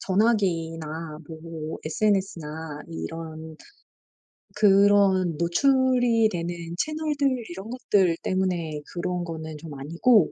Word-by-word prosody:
전화기나 165 -7 0
뭐 160 -1 -7
SNS나 160 -5 -1
이런 160 - -7 1.0
그런 200 -3 +5
노출이 245 - +3
되는 175 -3 -3 0.2
채널들 295 - 0
이런 190 +5 -7
것들 200 -8 +2
때문에 175 -5 -1
그런 180 0 -2
거는 160 -2 -6
좀 155 0 -9
아니고 170 - +3
175 Hz, 210 characters per minute, -25 LUFS, 160-210 Hz, 1.0 s, 그런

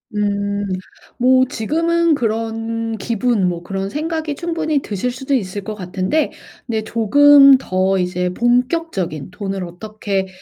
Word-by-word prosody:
음. 200 0 -1 0.5
뭐 255 +1 +4
지금은 330 +7 +1
그런 225 -1 -2
기분 230 -3 0
뭐 170 -1 -5
그런 195 +2 -4
생각이 310 +3 -3
충분히 325 -2 -1
드실 210 +4 -3
수도 265 +2 -4
있을 205 -5 -1
것 215 - -5
같은데 190 - -1 0.4
근데 220 -3 -1
조금 275 +5 +6
더 190 -5 0
이제 180 0 -1
본격적인 240 - 0
돈을 195 -2 -4
어떻게 195 +2 -4
225 Hz, 255 characters per minute, -19 LUFS, 195-275 Hz, 0.5 s, 조금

